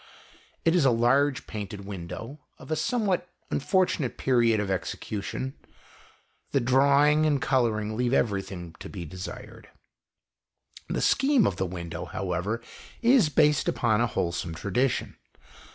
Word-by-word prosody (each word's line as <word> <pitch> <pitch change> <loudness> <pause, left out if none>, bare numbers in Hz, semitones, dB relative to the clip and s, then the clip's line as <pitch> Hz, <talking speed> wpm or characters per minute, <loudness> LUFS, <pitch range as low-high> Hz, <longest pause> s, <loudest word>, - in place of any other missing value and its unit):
It 165 - +4
is 175 - +4
a 135 - +5
large 130 +4 +2
painted 105 -2 -6
window, 100 - -7 0.2
of - - -12
a - - +2
somewhat 195 -3 0 0.2
unfortu 185 +5 +1
nate 130 -5 -3
period 120 -4 +3
of 100 -2 -1
execution. 105 +7 -4 1.0
The 140 - +4
drawing 140 +4 +4
and 145 -2 +2
colouring 110 -6 0
leave 120 +1 0
everything 95 -8 -1
to - - -8
be 90 -4 -6
desired. 90 +3 -9 1.2
The - - -1
scheme 275 -5 +3
of 95 - 0
the 95 - -1
window, 85 -1 -6
however, 95 +6 -3 0.4
is 240 - +5
based 150 -1 +3
upon 110 -2 +1
a 120 - +3
wholesome 85 -5 -2
tradition. 115 +9 -1
120 Hz, 135 wpm, -27 LUFS, 95-145 Hz, 1.2 s, a